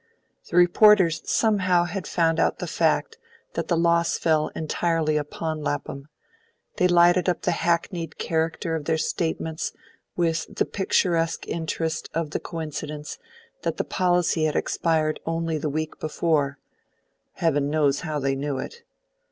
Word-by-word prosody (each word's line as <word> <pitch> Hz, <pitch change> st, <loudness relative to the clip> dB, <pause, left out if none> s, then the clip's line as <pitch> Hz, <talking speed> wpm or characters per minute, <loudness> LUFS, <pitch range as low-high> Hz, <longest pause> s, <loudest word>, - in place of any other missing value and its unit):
The 175 Hz, -, -1 dB
reporters 180 Hz, -2 st, +5 dB
somehow 185 Hz, -5 st, +3 dB
had 175 Hz, +1 st, -4 dB
found 165 Hz, -1 st, +1 dB
out -, -, +2 dB
the -, -, -4 dB
fact 455 Hz, 0 st, 0 dB, 0.3 s
that -, -, -3 dB
the 170 Hz, -, +1 dB
loss 170 Hz, 0 st, +2 dB
fell 155 Hz, -2 st, +2 dB
entirely 160 Hz, 0 st, 0 dB
upon 155 Hz, +1 st, -3 dB
Lapham; 140 Hz, -1 st, -4 dB, 0.7 s
they 180 Hz, -, +4 dB
lighted 175 Hz, +1 st, +4 dB
up 175 Hz, -, -1 dB
the -, -, +2 dB
hackneyed 170 Hz, -1 st, -1 dB
character 160 Hz, 0 st, -1 dB
of 155 Hz, -2 st, -4 dB
their 160 Hz, 0 st, +1 dB
statements 160 Hz, 0 st, -2 dB, 0.4 s
with 165 Hz, -2 st, -1 dB
the -, -, +1 dB
picturesque 170 Hz, -4 st, 0 dB
interest 160 Hz, -1 st, -3 dB
OF 165 Hz, -2 st, -1 dB
the -, -, -2 dB
coincidence 150 Hz, -2 st, -6 dB, 0.4 s
that -, -, -2 dB
the -, -, 0 dB
policy 175 Hz, -3 st, +1 dB
had 155 Hz, -, 0 dB
expired 155 Hz, -2 st, 0 dB
only 165 Hz, -1 st, -1 dB
the 150 Hz, -, -2 dB
week 155 Hz, +2 st, -4 dB
before; 150 Hz, -3 st, 0 dB, 0.8 s
heaven 145 Hz, -4 st, +1 dB
knows 145 Hz, -2 st, +2 dB
how 155 Hz, -3 st, -3 dB
they 135 Hz, -1 st, 0 dB
knew 140 Hz, 0 st, -2 dB
it. 470 Hz, -, -7 dB
165 Hz, 145 wpm, -24 LUFS, 155-175 Hz, 0.8 s, reporters